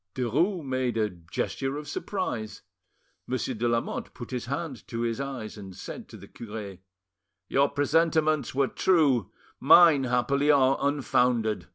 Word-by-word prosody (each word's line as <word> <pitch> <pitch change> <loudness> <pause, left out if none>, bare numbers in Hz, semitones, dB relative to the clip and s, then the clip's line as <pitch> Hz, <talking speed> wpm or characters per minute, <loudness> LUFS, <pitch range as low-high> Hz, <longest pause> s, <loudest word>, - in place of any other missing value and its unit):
Derues 155 - 0
made 130 -3 -1
a 105 -2 +1
gesture 100 - -4
of 150 0 -7
surprise. 120 - -4 0.6
Monsieur 130 0 -2
de 120 +1 -1
Lamotte 115 0 -2
put 120 - -9
his 125 -2 -3
hand 140 -3 -5
to 115 -1 -4
his 115 +1 -1
eyes, 125 -6 -6
and 95 -2 -10
said - - -8
to - - -11
the - - -13
cure— 105 -4 -8 0.7
"Your 140 +1 +2
presentiments 155 0 +1
were 135 0 +2
true; 140 - +2 0.3
mine, 155 -2 +7
happily, 130 +4 +1
are 135 -2 +5
unfounded. 125 -6 +1
130 Hz, 145 wpm, -27 LUFS, 115-145 Hz, 0.7 s, mine